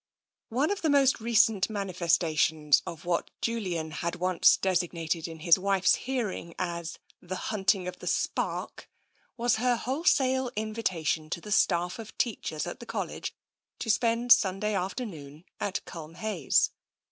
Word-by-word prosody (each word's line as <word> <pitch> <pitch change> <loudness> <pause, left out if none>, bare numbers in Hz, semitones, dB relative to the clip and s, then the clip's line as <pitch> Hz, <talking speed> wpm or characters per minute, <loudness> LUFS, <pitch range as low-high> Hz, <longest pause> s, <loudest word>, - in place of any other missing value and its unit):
One 270 - +1
of 405 - -2
the 320 - +1
most 275 -2 +4
recent 225 -3 +3
manifestations 165 -6 +2
of 165 0 -7
what 175 -1 0
Julian 185 -9 -2
had 170 +2 -3
once 180 -1 +4
designated 170 -3 -1
in 160 -1 -9
his 170 +1 +5
wife's 195 0 +3
hearing 230 -10 -3
as 170 -2 -4 0.2
the 185 +1 -5
" - - -2
Hunting 195 -3 +1
of 180 0 -6
the - - -8
Spark," - - -2 0.5
was 240 0 +2
her 245 +1 +2
wholesale 260 -1 +1
invi 215 +1 -3
tation 160 -5 -1
to 170 - -3
the 210 +4 -9
staff 180 -2 +2
of 220 -1 -10
teachers 175 -9 -2
at - - -6
the - - -10
College - - -4 0.4
to 225 - 0
spend 235 +2 +1
Sunday 210 -2 +4
afternoon 180 - -5 0.2
at 200 -1 -2
Culmhayes. 165 0 0
190 Hz, 145 wpm, -28 LUFS, 170-230 Hz, 0.5 s, his